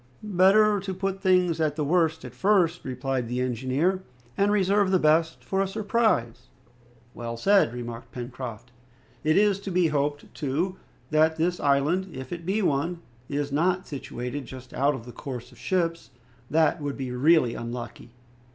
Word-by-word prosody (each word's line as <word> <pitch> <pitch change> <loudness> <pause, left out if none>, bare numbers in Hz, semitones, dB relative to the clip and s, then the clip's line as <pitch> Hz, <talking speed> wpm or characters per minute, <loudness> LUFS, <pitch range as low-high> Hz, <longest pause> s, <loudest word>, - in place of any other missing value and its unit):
"Better 205 +1 +4
to 190 -1 -5
put 195 +1 -3
things 180 -4 +3
at 150 -2 +1
the 150 - -1
worst 160 -1 +1
at 125 - -9
first," 180 +3 +2
replied 130 -1 -2
the 125 +2 -2
engineer, 130 - 0 0.3
"and 200 +1 +2
reserve 200 0 +3
the 190 - +4
best 160 0 +2
for 195 0 0
a 195 - +1
surprise." 195 - 0 0.7
"Well 115 0 -5
said," 195 - +4
remarked 120 -1 -7
Pencroft. 120 -1 -7 0.5
"It 155 +2 +3
is 205 -1 +3
to 200 - -6
be 180 -2 +2
hoped, 145 0 -2
too, 165 +7 -2 0.3
that 155 +1 +4
this 175 +2 0
island, 150 +7 +1
if 130 +4 -6
it 170 0 -7
be 205 +3 +1
one, 170 +3 0 0.3
is 145 0 -2
not 180 +6 +1
situated 130 -1 -6
just 130 -1 -10
out 140 +1 +2
of 115 - -9
the 120 - -9
course 125 -1 -7
of - - -18
ships; 170 -3 -1 0.4
that 160 +1 +2
would 145 -1 -3
be 130 -2 -4
really 130 -1 +4
unlucky!" 120 0 -7
155 Hz, 165 wpm, -26 LUFS, 130-185 Hz, 0.7 s, Better